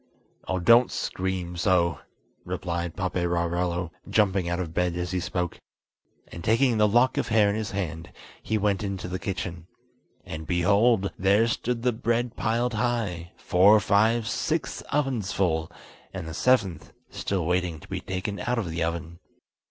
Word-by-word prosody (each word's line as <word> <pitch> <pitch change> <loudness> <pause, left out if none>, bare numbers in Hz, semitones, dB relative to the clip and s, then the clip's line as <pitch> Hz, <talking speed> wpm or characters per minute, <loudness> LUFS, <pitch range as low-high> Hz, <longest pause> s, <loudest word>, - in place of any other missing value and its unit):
"Oh, 95 - 0
don't 115 +7 +6
scream 90 -2 -3
so," 85 -1 +2 0.4
replied 85 -1 -3
Paperarello, 85 -1 -1 0.2
jumping 95 -4 +2
out 85 +1 -1
of 85 -3 -4
bed 90 -1 0
as 90 0 -3
he 90 - 0
spoke; 90 0 -3 0.7
and 85 - -9
taking 115 +2 +3
the 105 - +5
lock 120 +5 +3
of - - -1
hair 105 -2 +4
in - - -2
his 110 -2 -3
hand, 85 -5 -4 0.3
he 110 - -1
went 100 -2 +1
into 95 -2 -4
the 90 +1 -4
kitchen. 90 -3 -5 0.6
And, 80 0 -7
behold! 100 +4 +3
there 100 +4 +4
stood 120 0 -2
the 125 -1 +2
bread 115 +2 -1
piled 120 +2 0
high—four, 105 -3 +2
five, 110 +3 +2
six 155 +8 -2
ovens 130 -9 0
full, 80 -4 0 0.4
and 80 - -6
the 80 - -6
seventh 100 -6 +1 0.2
still 95 -4 -2
waiting 90 -2 0
to - - -15
be - - -4
taken 95 +2 -4
out 125 0 -1
of 95 -8 -2
the 80 +1 -1
oven. 85 0 -4
95 Hz, 155 wpm, -26 LUFS, 85-110 Hz, 0.7 s, don't